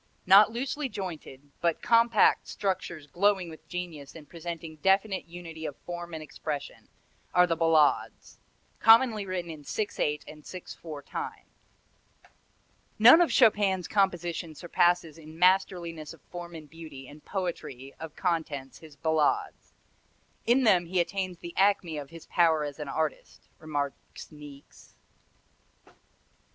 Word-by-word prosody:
Not 200 +3 +7
loosely 270 +4 -3
jointed, 155 - -7
but 170 -2 0
compact 235 0 +4
structures 180 -6 -3
glowing 185 +2 +1
with 160 - -14
genius 170 -6 -6
and 155 -3 -12
presenting 165 -1 -7
definite 195 +3 +1
unity 165 -2 -9
of 140 - -8
form 175 -1 -6
and 155 - -6
expression, 150 0 -6 0.5
are 180 0 +7
the 170 -2 0
ballades 160 -2 +1 0.4
commonly 225 -3 +5
written 180 -2 -3
in 155 -2 -10
six 210 +8 -4
eight 150 0 0
and 150 0 -12
six 185 +3 -8
four 150 -4 -9
time. - - -6 1.5
"None 245 +10 +9
of 345 - +3
Chopin's 205 -7 +3
compositions 175 -5 -1
surpasses 175 -2 +1
in 155 0 -12
masterliness 170 -3 +1
of 160 - -26
form 175 -1 -7
and 155 -2 -10
beauty 155 -4 -11
and 150 +2 -14
poetry 150 -8 -5
of 160 -1 -8
contents 155 -7 -2
his 155 -2 -14
ballades. 160 -1 0 0.7
In 250 +3 +4
them 180 -7 +4
he 180 +1 0
attains 185 +1 -2
the 170 0 -9
acme 190 -5 +2
of 140 -1 -8
his 165 -1 -12
power 165 -3 +3
as 145 0 -6
an 150 - -5
artist," 155 0 -4
remarks 145 -2 -5
Niecks. 145 -2 -14
170 Hz, 135 wpm, -28 LUFS, 155-190 Hz, 1.5 s, None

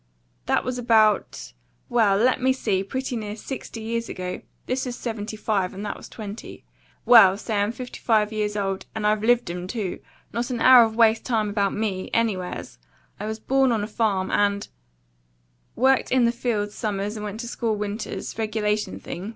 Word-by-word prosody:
That - - +2
was 250 0 -3
about 220 - +2 0.3
well, 215 -5 +3
let 255 +4 +2
me 260 +1 +3
see! 200 -7 0
pretty 260 +5 -3
near 210 -2 -4
sixty 230 0 -7
years 230 +1 -3
ago: 180 0 -5 0.2
this 255 +1 -2
is 245 - -4
'75, 215 -4 -2
and 200 +2 -6
that 205 - -3
was - - -11
'20. 215 0 -9 0.4
Well, 200 -6 +8
say 210 -1 -1
I'm 205 +2 +1
fifty 250 +1 -8
five 215 -2 +2
years 210 -1 -1
old; 195 -1 -2
and 220 -1 -2
I've 210 0 +2
LIVED 240 -5 +3
'em, 180 +1 -5
too; 200 -3 -3 0.3
not 235 +2 -2
an 245 -2 -2
hour 255 -1 +8
of 220 0 -4
waste 225 -1 +4
time 220 -4 0
about 200 -1 0
ME, 205 -3 -2
anywheres! 185 - -2 0.4
I 210 - -4
was 220 0 -4
born 265 +2 +2
on 220 -3 0
a - - -3
farm, 205 -4 0
and 200 0 +1 0.6
" - - -42
"Worked 265 +2 +3
in 255 -1 +4
the 235 - +3
fields 225 -4 -2
summers 205 -1 -3
and 210 - -6
went 210 +1 -5
to 235 - -6
school 230 -2 -1
winters: 210 +2 -5
regulation 215 -1 -1
thing?" 185 +5 -6
215 Hz, 185 wpm, -24 LUFS, 200-235 Hz, 0.6 s, Well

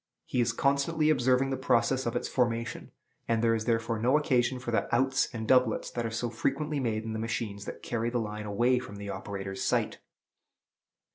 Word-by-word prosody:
He 125 - 0
is 120 0 +2
constantly 140 +5 +2
observing 130 -1 +2
the 135 - -1
process 130 0 +2
of 120 - -2
its 120 - -1
formation; 115 -2 -1 0.4
and 115 0 +1
there 115 -1 +4
is 110 -1 -1
therefore 115 -1 0
no 125 +6 +4
occasion 130 -4 +1
for 125 -1 -5
the 115 - +1
"outs" 130 +2 +2
and 110 -3 -5
"doublets" 125 -4 +3
that 120 -1 -2
are - - -3
so 115 +1 -3
frequently 150 +5 -1
made 110 -4 -1
in 110 0 -4
the 110 - -3
machines 110 -3 -3
that - - -8
carry 120 -1 -1
the 120 - -1
line 105 -2 -4
away 120 +5 +2
from 105 -5 -9
the 100 0 -6
operator's 95 0 -5
sight. - - 0
120 Hz, 200 wpm, -29 LUFS, 110-130 Hz, 0.4 s, there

